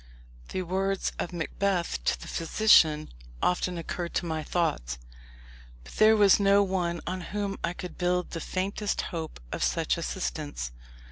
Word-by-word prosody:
The 185 - -2
words 190 +2 -1
of 175 - -2
Macbeth 175 - -1
to 60 - +1
the - - -9
physician 165 -4 +4 0.3
often 180 - 0
occurred 170 +1 -4
to - - 0
my 160 -1 -2
thoughts. 150 - -1 0.9
But - - -13
there 220 0 +6
was 205 -1 +6
no 200 0 +5
one 175 -3 -1
on 185 +1 -3
whom 200 +2 -3
I 170 - 0
could 180 0 -8
build 180 0 0
the 165 - -4
faintest 200 +4 -1
hope 160 -2 -5
of - - -4
such - - +1
assistance. 60 0 -3
180 Hz, 150 wpm, -28 LUFS, 160-195 Hz, 0.9 s, there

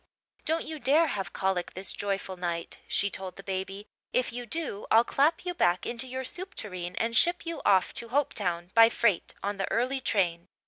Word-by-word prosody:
"Don't 325 +1 +1
you 315 -1 -6
dare 290 +6 +4
have 195 - -3
colic 190 -2 -1
this 190 +1 +3
joyful 195 -1 -3
night," 170 -2 -4
she 200 0 +1
told 185 -1 -5
the 195 - -10
baby. 195 +1 -4 0.3
"If 250 -2 0
you 245 0 -5
do 285 -6 -3
I'll 225 +1 +6
clap 305 +8 +1
you 355 - -1
back 175 - +2
into 240 +2 -3
your 260 +1 -4
soup 370 +8 -6
tureen 180 -3 -5
and 230 0 -1
ship 345 +9 +4
you 335 0 -4
off 190 -2 +4
to 235 - -5
Hopetown 185 -10 0
by 225 0 +8
freight 210 -6 +1
on 200 0 -2
the 195 - -2
early 255 +4 0
train. 175 -7 0
210 Hz, 195 wpm, -28 LUFS, 190-260 Hz, 0.3 s, by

